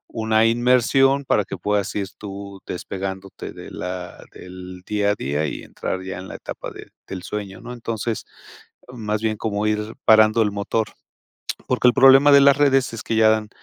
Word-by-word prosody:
una 110 Hz, 0 st, +2 dB
inmersión 125 Hz, +4 st, +3 dB
para 105 Hz, -, +2 dB
que 100 Hz, -, -6 dB
puedas 100 Hz, +2 st, -1 dB
ir 100 Hz, -2 st, -2 dB
tú 100 Hz, -1 st, -8 dB
despegándote 95 Hz, +1 st, -6 dB
de -, -, -11 dB
la 90 Hz, -1 st, -6 dB
del 90 Hz, 0 st, -10 dB
día 105 Hz, -1 st, +1 dB
a -, -, 0 dB
día 75 Hz, 0 st, -2 dB
y -, -, -6 dB
entrar 95 Hz, -, -5 dB
ya 95 Hz, -1 st, -6 dB
en 95 Hz, -, -9 dB
la -, -, -8 dB
etapa -, -, -7 dB
de -, -, -12 dB, 0.2 s
del 95 Hz, -2 st, -7 dB
sueño, 100 Hz, -1 st, -6 dB
¿no?, -, -, -9 dB
entonces, 115 Hz, -2 st, -4 dB, 0.7 s
más 110 Hz, -3 st, -3 dB
bien 110 Hz, -1 st, -1 dB
como 105 Hz, -1 st, -2 dB
ir 105 Hz, +1 st, -2 dB
parando 110 Hz, +1 st, +6 dB
el 105 Hz, -, -1 dB
motor, 100 Hz, +2 st, -1 dB, 0.8 s
porque 125 Hz, -1 st, +3 dB
el 120 Hz, -, +3 dB
problema 135 Hz, +2 st, +7 dB
de 140 Hz, -, +8 dB
las 140 Hz, 0 st, +6 dB
redes 135 Hz, -4 st, +3 dB
es 115 Hz, -, -6 dB
que 115 Hz, -, -2 dB
ya 110 Hz, 0 st, +5 dB
dan 110 Hz, -1 st, 0 dB
105 Hz, 185 wpm, -22 LUFS, 95-115 Hz, 0.8 s, de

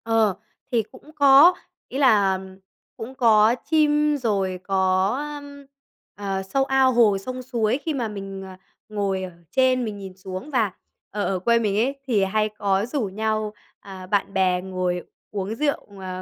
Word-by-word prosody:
Ờ, 225 Hz, -3 st, +2 dB, 0.4 s
thì 235 Hz, -3 st, +2 dB
cũng 290 Hz, +3 st, -15 dB
có, 285 Hz, +4 st, +7 dB, 0.3 s
ý 265 Hz, -, -6 dB
là 205 Hz, -8 st, +4 dB, 0.6 s
cũng 245 Hz, +4 st, -8 dB
có 225 Hz, -3 st, +5 dB
chim 300 Hz, -1 st, +3 dB
rồi 195 Hz, -7 st, -1 dB
có, 190 Hz, 0 st, +2 dB
ơ, 295 Hz, 0 st, -5 dB, 1.0 s
ờ, 190 Hz, -, -3 dB
sâu 270 Hz, +8 st, 0 dB
ao 265 Hz, -1 st, +3 dB
hồ, 225 Hz, -4 st, +4 dB
sông 255 Hz, +6 st, -6 dB
suối. 240 Hz, -2 st, 0 dB
Khi 320 Hz, -, 0 dB
mà 245 Hz, -5 st, -2 dB
mình, 195 Hz, -2 st, -7 dB
ờ, 190 Hz, -1 st, -10 dB, 0.3 s
ngồi 200 Hz, -3 st, -1 dB
ở 185 Hz, -, -6 dB, 0.2 s
trên 255 Hz, -1 st, +2 dB
mình 210 Hz, -2 st, -5 dB
nhìn 190 Hz, -2 st, -9 dB
xuống 190 Hz, +7 st, -7 dB
và 225 Hz, -7 st, +1 dB, 0.4 s
ở 205 Hz, 0 st, -2 dB
ở 190 Hz, -1 st, -1 dB
quê 235 Hz, +5 st, +3 dB
mình 205 Hz, -3 st, 0 dB
ấy 255 Hz, +6 st, +1 dB
thì 215 Hz, -6 st, +2 dB
hay 215 Hz, +3 st, +1 dB
có 200 Hz, -1 st, 0 dB
rủ 250 Hz, -1 st, -2 dB
nhau, 215 Hz, +1 st, -2 dB, 0.3 s
à, 190 Hz, -2 st, -10 dB
bạn 195 Hz, 0 st, 0 dB
bè 185 Hz, -2 st, +2 dB
ngồi 180 Hz, -1 st, -2 dB, 0.3 s
uống 205 Hz, +1 st, -3 dB
rượu, 280 Hz, -8 st, -2 dB
à, 185 Hz, -1 st, -5 dB
215 Hz, 170 wpm, -23 LUFS, 190-255 Hz, 1.0 s, có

